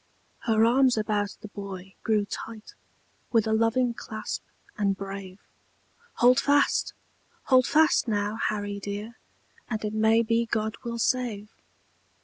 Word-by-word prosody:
Her 225 -2 +4
arms 255 +1 +4
about 210 -2 -1
the - - -8
boy 195 -2 -8
grew 215 -2 +1
tight, 220 +1 -8 0.6
With 225 -3 +3
a 220 - 0
loving 230 +2 +2
clasp, 220 -2 -5 0.3
and 200 -2 0
brave; 195 -1 -7 0.8
"Hold 245 +1 +5
fast! 285 0 +2 0.5
Hold 255 -2 +4
fast, 315 -4 +4
now, 210 0 -1
Harry 205 -2 -2
dear, 205 +4 -6 0.5
And 220 -2 -3
it 210 - -3
may 220 +1 +4
be 230 +1 +1
God 220 -1 -1
will 235 0 -4
save." 230 -4 -1
220 Hz, 130 wpm, -27 LUFS, 205-235 Hz, 0.8 s, Hold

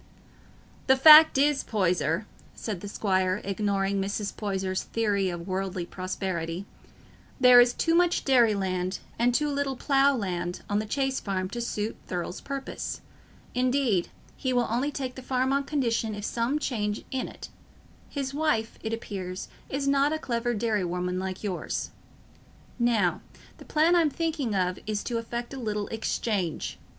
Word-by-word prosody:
"The 265 0 +5
fact 310 +2 +9
is, 285 0 +3
Poyser," 180 -2 0 0.3
said 205 -6 -5
the 205 - -6
squire, 190 -2 0
ignoring 195 0 0
Mrs. 200 +1 -3
Poyser's 190 -2 -2
theory 205 -4 0
of 175 -1 -6
worldly 185 -1 -2
prosperity, 185 -1 -4 0.7
"there 250 -1 +9
is 245 0 +4
too 330 +6 0
much 350 0 +3
dairy 240 -6 +5
land, 185 -1 -1 0.2
and 240 +1 +4
too 300 +5 +1
little 280 -2 -1
plough 275 +1 +3
land, 180 -5 -3
on 205 0 +1
the 215 - -3
Chase 270 +2 0
Farm 185 -2 -2
to 240 - -3
suit 215 -2 -3
Thurle's 180 0 -4
purpose—indeed, 255 -4 -2 0.3
he 260 - -2
will 245 -1 +2
only 250 +5 +1
take 270 -3 -4
the 260 - -9
farm 255 +1 0
on 280 0 +1
condition 230 -7 0
of 205 0 -5
some 235 +6 0
change 210 -8 -2
in 260 -1 -2
it: - - -10 0.6
his 275 -2 -4
wife, 290 -7 0
it 220 0 -3
appears, 190 -5 -5 0.2
is 275 +1 -2
not 280 +1 +3
a 315 - 0
clever 240 -4 -1
dairy 215 -2 0
woman, 180 +1 -2
like 190 +1 -5
yours. 190 -4 -3 0.9
Now, 225 -7 +2 0.4
the - - -12
plan 320 +3 +3
I'm 330 -3 +4
thinking 300 -7 -2
of 185 -1 0
is 210 -1 -2
to 235 -2 -2
effect 235 +2 -5
a 270 - -6
little 210 -3 -2
exchange. 210 -5 -2
225 Hz, 155 wpm, -27 LUFS, 190-265 Hz, 0.9 s, fact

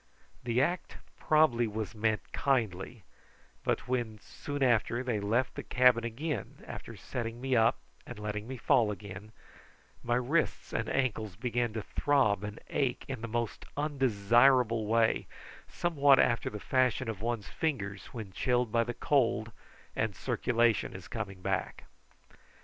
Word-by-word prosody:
The 120 +2 +2
act 175 +4 -2 0.2
probably 155 -7 +3
was 105 -3 -4
meant 110 0 -1
kindly, 115 -4 -1 0.6
but - - -1
when, 120 -4 -1
soon 145 +5 -5
after, 120 0 +2
they 120 -5 -1
left 115 +6 0
the - - -5
cabin, 125 +1 +1
after - - -8
setting 115 -1 -5
me 130 0 0
up 115 +2 +4 0.3
and 120 - -8
letting 105 0 -4
me 130 0 -5
fall 115 -1 +3
again, 105 0 -7 0.7
my 120 0 0
wrists 130 +7 0
and - - -1
ankles 110 -7 -1
began 120 +1 -1
to 110 -2 -3
throb 125 -9 +2
and 105 0 -6
ache 135 -4 0
in 130 -4 -5
the 115 - -4
most 115 0 -3
unbearable 120 -4 +3
way, 115 0 +2 0.4
somewhat 145 -5 +3
after 120 -2 +2
the 105 - -7
fashion 130 +1 +1
of 110 -3 -4
one's 115 -3 -2
fingers 105 -11 -3
when 110 -5 -8
chilled 125 +1 +1
by 115 +1 +3
the 120 0 -5
cold 120 -5 +1 0.4
and 110 -3 -1
the - - -15
circulation 120 -4 +1
is 95 0 -9
coming 95 -4 -6
back. - - -2
120 Hz, 145 wpm, -31 LUFS, 110-130 Hz, 0.7 s, up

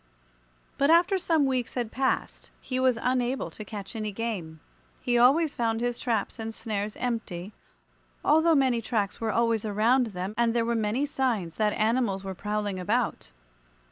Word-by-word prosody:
But 280 - +3
after 355 +4 +5
some 325 -5 +2
weeks 255 -3 -1
had 240 -3 -2
passed 260 +1 -1
he 255 -1 -3
was 255 -2 +3
unable 250 +1 0
to 215 - -8
catch 200 -1 -7
any 215 -1 -3
game. 195 -8 -4 0.4
He 245 - 0
always 280 +6 +4
found 225 -1 0
his 240 0 -2
traps 230 -2 -2
and 225 0 -4
snares 210 -2 -3
empty, 215 -6 -4 0.7
although 320 +1 +5
many 260 -4 +2
tracks 215 -3 -2
were 225 -1 0
always 230 -2 +1
around 225 +4 +2
them, 190 -1 -5
and 235 0 +2
there 230 -1 +2
were 235 - 0
many 225 +5 0
signs 235 - -1
that 210 -1 +2
animals 215 -3 +1
were 190 -1 -4
prowling 210 0 -3
about. 210 - -1
230 Hz, 165 wpm, -27 LUFS, 210-255 Hz, 0.7 s, after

